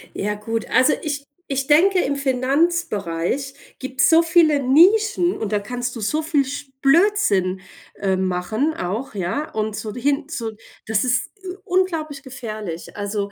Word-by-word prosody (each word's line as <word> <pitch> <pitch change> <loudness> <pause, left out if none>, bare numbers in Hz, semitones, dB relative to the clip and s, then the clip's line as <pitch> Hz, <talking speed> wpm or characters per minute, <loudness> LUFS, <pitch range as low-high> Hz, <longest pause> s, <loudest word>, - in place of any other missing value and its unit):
Ja, 210 +1 -2
gut. 225 +2 -3
Also 260 +3 +4
ich 285 -2 -3 0.3
ich 270 0 0
denke, 350 +7 +4
im 285 -5 0
Finanzbereich 270 - 0 0.2
gibt's 265 0 +1
so 325 0 +6
viele 325 -3 +4
Nischen 360 - +4
und 215 -2 -4
da 210 - +2
kannst 245 +4 -4
du - - -6
so 300 +10 0
viel 305 -3 +1
sch 285 +1 -6
Blödsinn, 275 - +3 0.4
äh, 190 -1 +1
machen 190 - -1
auch, 210 +7 -4
ja? 200 - -2
Und 215 -1 -2
so 215 0 -5
hin 280 +4 -1
zu 230 -8 -4 0.3
das 215 -1 +1
ist, 255 +1 0
äh, 365 -1 -6
unglaublich 335 -7 -1
gefährlich. 215 - -7
Also 205 0 -3
265 Hz, 155 wpm, -21 LUFS, 210-310 Hz, 0.4 s, so